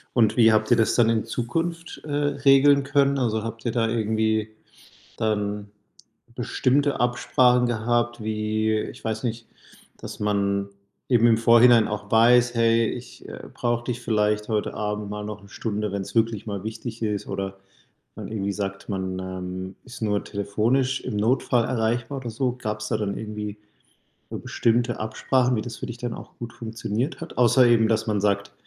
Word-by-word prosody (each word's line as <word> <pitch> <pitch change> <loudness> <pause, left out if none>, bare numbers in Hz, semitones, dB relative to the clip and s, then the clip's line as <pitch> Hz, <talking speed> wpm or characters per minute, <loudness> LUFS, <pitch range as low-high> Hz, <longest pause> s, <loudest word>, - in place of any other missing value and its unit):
Und 110 -1 +3
wie 115 -1 +6
habt 110 0 +2
ihr 120 - +6
das 110 - +2
dann 115 -2 +4
in 115 -1 +1
Zukunft, 165 +7 -3
äh, 150 - -6
regeln 140 -1 +4
können? 140 0 +2
Also, 110 -4 0
habt 115 +1 -7
ihr 115 - +1
da 115 -1 +1
irgendwie 110 -1 0 0.7
dann 105 -1 -2 0.7
bestimmte 130 +3 +1
Absprachen 125 0 +3
gehabt, 120 0 0
wie 110 0 0
ich 130 - -8
weiß 110 +1 -3
nicht, 115 -1 -3 0.5
dass - - -9
man 100 -1 0 0.4
eben 120 -2 +5
im 110 -1 +4
Vorhinein 115 0 +6
auch 105 0 -5
weiß: 120 +2 +5
„Hey, 115 0 +3
ich, 125 0 -9
äh, - - -8
brauche 120 0 -1
dich 125 -1 -3
vielleicht 105 -2 0
heute 105 -1 -1
Abend 105 -1 -3
mal 105 0 -5
noch 105 -1 -7
1 100 - -15
Stunde, 105 -2 -3
wenn 100 0 -2
es 100 +3 -11
wirklich 115 -2 +1
mal 100 -2 -4
wichtig 110 +1 -6
ist“, 105 -2 -2
oder 95 0 -4 0.6
man 105 -1 -6
irgendwie 100 -2 -2
sagt, 100 -1 -5
man, 95 -2 -3
ähm, 95 0 -6
ist 125 -3 -11
nur 105 -1 0
telefonisch 115 +6 0
im 120 -5 -4
Notfall 120 +2 +2
erreichbar 120 +3 -1
oder 120 -3 -6
so? 125 +2 -1
Gab 105 -2 -3
es 110 - -4
da - - 0
dann 100 -2 -2
irgendwie 105 -1 -6 0.7
so - - -5
bestimmte 120 +1 0
Absprachen, 125 +3 +1
wie 110 - -1
das 120 -3 -7
für - - -6
dich 120 - -7
dann 120 -1 -4
auch - - -11
gut 120 -1 -7
funktioniert 115 +4 -4
hat, 165 - -8
außer 125 +1 +5
eben, 115 -2 +4
dass 110 0 +1
man 105 -2 0
sagt, 100 0 0
110 Hz, 180 wpm, -24 LUFS, 105-120 Hz, 0.7 s, wie